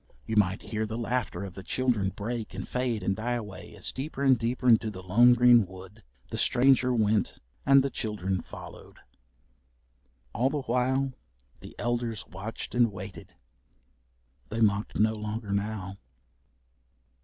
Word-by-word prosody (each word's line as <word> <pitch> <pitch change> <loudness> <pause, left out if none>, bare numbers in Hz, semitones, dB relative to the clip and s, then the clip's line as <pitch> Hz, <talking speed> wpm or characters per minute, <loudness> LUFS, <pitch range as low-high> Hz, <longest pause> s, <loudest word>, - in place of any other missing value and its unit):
You 110 - -3
might 100 -1 +2
hear 110 0 -3
the 110 +1 -4
laughter 120 -5 -2
of 95 -2 -7
the 95 - -8
children 115 -2 0
break 110 +2 -5
and 95 - -5
fade 125 -5 -1
and 95 +1 +1
die 120 +4 -2
away 105 -5 -7
as - - -3
deeper 140 +1 -4
and 135 -2 +6
deeper 120 +2 -2
into 115 -2 +5
the 95 -3 -8
lone 120 +7 +6
green 120 -1 +6
wood 95 +3 -12 0.3
the - - -2
stranger 125 0 +4
went 110 -3 +1 0.3
and 135 -1 +7
the 140 - -1
children 95 -5 -2
followed. - - -11 1.4
All 125 +4 +2
the 145 -1 -2
while, 130 +2 +1 0.5
the - - -12
elders 120 -2 -2
watched 100 +5 -7
and 120 -2 +3
waited. 95 -2 -9 1.1
They 110 - -3
mocked 105 -1 +1
no 110 +1 +4
longer 105 0 -5
now. 100 -1 -3
110 Hz, 150 wpm, -28 LUFS, 100-125 Hz, 1.4 s, and